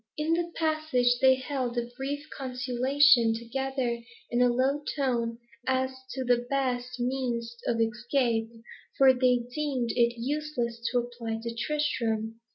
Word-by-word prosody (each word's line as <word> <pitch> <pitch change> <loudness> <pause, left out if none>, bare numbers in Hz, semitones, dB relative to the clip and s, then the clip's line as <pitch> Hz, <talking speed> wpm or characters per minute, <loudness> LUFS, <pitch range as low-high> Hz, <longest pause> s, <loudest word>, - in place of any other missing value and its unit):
In 305 +2 +1
the 345 0 -1
passage, 310 -7 +1
they 260 0 +6
held 255 -2 -3
a 240 - 0
brief 285 +3 -4
consultation 255 -1 +3
together 245 0 -2 0.3
in 240 +1 +2
a 250 - +5
low 265 +4 +1
tone, 235 -5 0 0.3
as 260 0 +1 0.2
to 260 - -3
the 245 -1 +1
best 250 -2 -1
means 240 -2 -2
of 230 - +1
escape, 230 0 0 0.5
for 265 -1 +7
they 250 -1 +2
deemed 265 -6 -1
it 235 0 +2
useless 250 -3 -2
to 250 - +1
apply 235 -2 -3
to 235 0 -3
Tristram. 230 -5 -1
250 Hz, 140 wpm, -28 LUFS, 235-275 Hz, 0.5 s, for